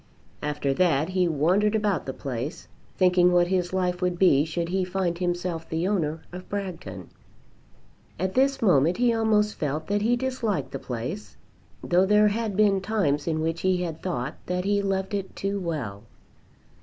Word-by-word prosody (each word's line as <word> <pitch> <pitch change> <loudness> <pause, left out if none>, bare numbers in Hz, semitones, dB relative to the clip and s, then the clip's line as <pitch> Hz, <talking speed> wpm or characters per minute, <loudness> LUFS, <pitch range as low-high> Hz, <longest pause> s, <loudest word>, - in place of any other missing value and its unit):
After 145 -2 -1
that 160 -1 +2
he 185 -1 +1
wandered 180 +8 +2
about 205 -9 0
the - - -1
place, 130 +4 -5 0.3
thinking 180 -1 +4
what 175 0 +3
his 180 -2 0
life 180 -1 -1
would 180 -1 0
be 155 -6 +4
should 170 +1 -3
he 190 +1 0
find 180 -2 -2
himself 175 -2 -2
the 165 +3 -1
owner 165 -6 -1
of 180 +1 -9
Bragton. 165 - -5 1.1
At 185 +2 -2
this 270 -1 +2
moment 170 -3 +4
he 240 0 +3
almost 215 -2 +2
felt 150 +1 -3
that 205 +1 0
he 235 +3 +3
disliked 235 - -2
the 135 - -5
place, 130 - -6 0.5
though 180 +2 +3
there 210 +1 +5
had 215 -2 -2
been 200 -2 +4
times 190 -9 0
in 155 -1 0
which 165 +1 -2
he 185 -1 +1
had 165 -2 -5
thought 150 -10 -3
that 180 +1 -1
he 200 0 +2
loved 195 +1 -2
it 195 -2 -3
too 200 +1 -2
well. 140 - -4
180 Hz, 170 wpm, -26 LUFS, 160-200 Hz, 1.1 s, there